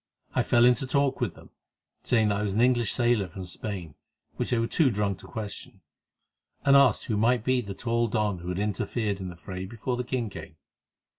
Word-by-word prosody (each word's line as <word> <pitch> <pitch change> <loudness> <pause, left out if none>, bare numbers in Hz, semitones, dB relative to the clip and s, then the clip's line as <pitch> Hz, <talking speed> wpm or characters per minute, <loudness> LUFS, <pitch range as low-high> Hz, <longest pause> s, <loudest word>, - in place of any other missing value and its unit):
I - - +2
fell 120 0 +4
into 125 +1 +3
talk 140 -1 +1
with 110 -8 -1
them, - - -16 0.5
saying 110 -3 +2
that 100 0 0
I - - -1
was 105 -2 -1
an 110 - +3
English 120 -2 +3
sailor 120 -5 +2
from 90 +2 -8
Spain, 90 -3 -5 0.4
which - - -2
they 120 - +2
were 115 - +1
too 145 +4 +3
drunk 100 -3 -1
to - - -12
question, 105 -3 -7 0.8
and 140 0 +6
asked 140 -5 +5
who 110 - -1
might 115 +2 +2
be 130 0 +2
the 100 -4 -7
tall 115 +2 0
don 105 -4 0
who 85 +1 -6
had 90 - -2
interfered 105 +1 -1
in 95 - -5
the 90 - -9
fray 90 +2 -7
before 120 +4 -3
the 125 - -1
king 120 -3 -2
came. - - -9
110 Hz, 215 wpm, -27 LUFS, 100-125 Hz, 0.8 s, and